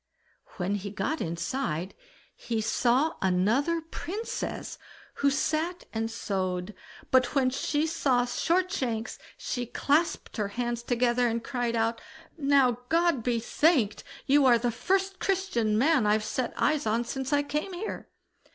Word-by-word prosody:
When 190 +1 -1
he 200 0 -3
got 205 +11 -2
inside, 170 - -2 0.4
he 230 -2 -3
saw 250 +8 +2
another 220 - +2
Princess, 375 +7 -5 0.4
who 280 - +5
sat 315 +5 -1
and 225 0 -1
sewed, 185 -3 -3 0.4
but 255 +1 +3
when 260 -2 +3
she 295 +3 0
saw 265 -6 +1
Shortshanks, 260 - -1 0.2
she 245 -2 -3
clasped 295 +6 0
her 210 -2 0
hands 240 +3 -3
together 245 0 +2
and 230 0 -1
cried 245 -3 -2
out: 230 0 0 0.3
"Now, 275 -5 +3
God 335 -5 +3
be 235 0 0
thanked! 240 - +2 0.2
you 285 +1 +4
are 240 -2 +6
the 240 +1 0
first 385 - 0
Christian 360 - 0
man 265 -2 +3
I've 210 +1 +3
set 250 +1 -2
eyes 300 -5 +1
on 225 +2 +1
since 265 +3 -4
I 290 0 +3
came 300 +6 -3
here." 380 +5 -5
245 Hz, 140 wpm, -28 LUFS, 225-305 Hz, 0.4 s, are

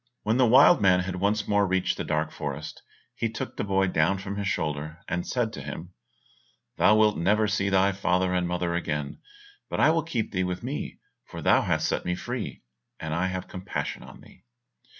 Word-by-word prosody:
When 110 +3 +1
the 130 -2 +5
wild 135 +8 +7
man 90 -2 +5
had 90 0 -4
once 100 +2 0
more 100 -1 +3
reached 95 -1 +1
the - - -3
dark - - -1
forest, 75 +1 -6 0.3
he 115 - -2
took 115 - -6
the - - -2
boy 95 -1 +2
down 90 +1 +2
from 95 +1 -5
his 100 -1 -2
shoulder, 75 -3 -2
and 90 0 -2
said 120 -3 -1
to 70 - -6
him, 80 +6 -7 0.8
"Thou 105 - +5
wilt 110 -4 +3
never 105 +5 +2
see 100 -1 0
thy 95 0 +3
father 95 -1 0
and 90 -1 +1
mother 90 -1 -1
again, 75 -4 -3 0.5
but - - -3
I 155 - +6
will 165 0 +2
keep 125 -10 -3
thee 95 -2 0
with 90 +3 -3
me, 135 +4 -4 0.3
for - - -9
thou - - +4
hast - - 0
set - - -1
me 90 0 -1
free, - - -5 0.4
and 80 -1 -4
I 85 +3 0
have 95 0 -4
compassion 95 +1 -5
on - - -13
thee. - - -18
95 Hz, 205 wpm, -26 LUFS, 90-105 Hz, 0.8 s, wild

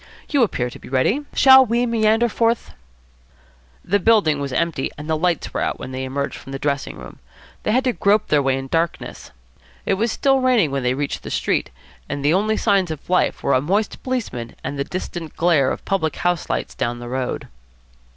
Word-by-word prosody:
You 285 -3 +2
appear 125 - 0
to - - -11
be - - -12
ready. 195 - +1
Shall 265 -1 +8
we 240 0 +1
meander 225 0 +2
forth?" 230 +1 0 1.1
The 205 +2 +2
building 195 -8 +3
was 140 -1 -3
empty 160 0 -1
and 150 +1 -8
the 160 - +1
lights 170 +1 -1
were - - -1
out - - -1
when 130 - -7
they 130 0 -4
emerged 140 +2 -3
from 135 - -10
the - - -2
dressing 140 0 -2
room. - - -11 0.4
They - - -1
had 255 +4 +2
to 255 -2 +1
grope 210 0 +2
their 150 -1 +4
way 135 -1 +1
in 135 0 -5
darkness. 165 +4 -2 0.6
It - - +2
was 220 +4 0
still 270 +1 +2
raining 245 - +3
when 140 0 -1
they 125 0 0
reached 145 +1 -3
the - - -8
street, - - 0 0.4
and 145 0 -3
the 150 - +4
only 215 +3 +1
signs 195 -5 +2
of 155 +2 -7
life 180 - +1
were 140 - +2
a 130 - +3
moist 200 +8 -1
policeman 215 - -4
and 140 +2 -4
the - - +1
distant 175 -1 -6
glare 160 -6 +3
of - - -5
public 160 -6 0
house 175 -2 -1
lights - - -2
down 120 0 -2
the 120 0 -8
road. 125 0 -3
170 Hz, 210 wpm, -21 LUFS, 140-220 Hz, 1.1 s, Shall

